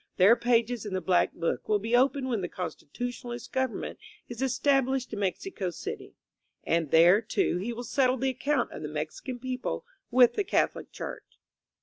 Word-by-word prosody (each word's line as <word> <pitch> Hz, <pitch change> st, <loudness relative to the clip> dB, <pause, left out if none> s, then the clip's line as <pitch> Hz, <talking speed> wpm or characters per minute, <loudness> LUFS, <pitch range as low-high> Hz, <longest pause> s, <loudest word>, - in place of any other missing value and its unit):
Their 195 Hz, +5 st, +7 dB
pages 235 Hz, -1 st, +1 dB
in 205 Hz, -3 st, -4 dB
the -, -, +1 dB
black 185 Hz, -1 st, +2 dB
book 165 Hz, -1 st, -2 dB
will 210 Hz, -, +4 dB
be 225 Hz, +4 st, 0 dB
opened 265 Hz, +1 st, +3 dB
when 235 Hz, -6 st, -1 dB
the 175 Hz, -, -3 dB
Constitutionalist 240 Hz, +8 st, -6 dB
government 260 Hz, -2 st, -2 dB, 0.3 s
is 240 Hz, 0 st, -7 dB
established 265 Hz, -1 st, +1 dB
in 210 Hz, -, -3 dB
Mexico 200 Hz, -, -2 dB
City; 170 Hz, -, -7 dB, 0.5 s
and 165 Hz, -3 st, 0 dB
there, 175 Hz, +7 st, +6 dB
too, 230 Hz, -, 0 dB
he 215 Hz, +6 st, -3 dB
will 240 Hz, +1 st, -5 dB
settle 255 Hz, +1 st, +2 dB
the 265 Hz, +2 st, 0 dB
account 270 Hz, 0 st, 0 dB
of -, -, -8 dB
the 150 Hz, -, -4 dB
Mexican 155 Hz, -, -5 dB
people 255 Hz, +1 st, -4 dB, 0.2 s
with 245 Hz, -1 st, +6 dB
the 410 Hz, -, 0 dB
Catholic 385 Hz, -, 0 dB
Church. -, -, -8 dB
240 Hz, 175 wpm, -28 LUFS, 190-260 Hz, 0.5 s, Their